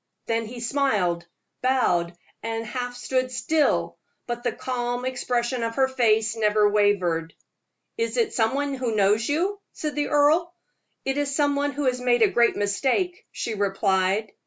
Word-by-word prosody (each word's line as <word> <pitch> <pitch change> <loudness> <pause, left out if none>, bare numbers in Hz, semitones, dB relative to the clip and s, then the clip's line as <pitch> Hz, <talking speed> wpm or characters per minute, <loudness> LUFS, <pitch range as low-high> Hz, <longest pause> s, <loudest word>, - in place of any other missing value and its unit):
Then 230 -1 -1
he 240 +1 -8
smiled, 210 -10 0 0.3
bowed, 175 -10 +1 0.2
and 225 0 -3
half 245 +1 -4
stood 255 0 -1
still; 300 +4 0 0.3
but 240 0 -4
the 240 - 0
calm 245 0 -3
expression 245 -1 -1
of 230 0 -2
her 265 -1 +3
face 225 -4 +2
never 210 -1 +3
wavered. 190 -6 +1 0.6
"Is 460 +2 -1
it 460 -3 +1
some 225 +2 +1
one 285 0 -1
who 250 -4 -2
knows 210 +4 +2
you?" 375 +7 0 0.2
asked 305 -1 -2
the 290 -1 -1
earl. 315 +4 +3 0.5
"It 270 +1 0
is 285 -1 -1
some 285 -1 +2
one 285 0 0
who 290 - -3
has 250 -2 0
made 240 -2 +3
a - - +5
great 235 0 +3
mistake," 265 - -1
she 230 - -4
replied. 195 0 +1
245 Hz, 160 wpm, -24 LUFS, 215-280 Hz, 0.6 s, a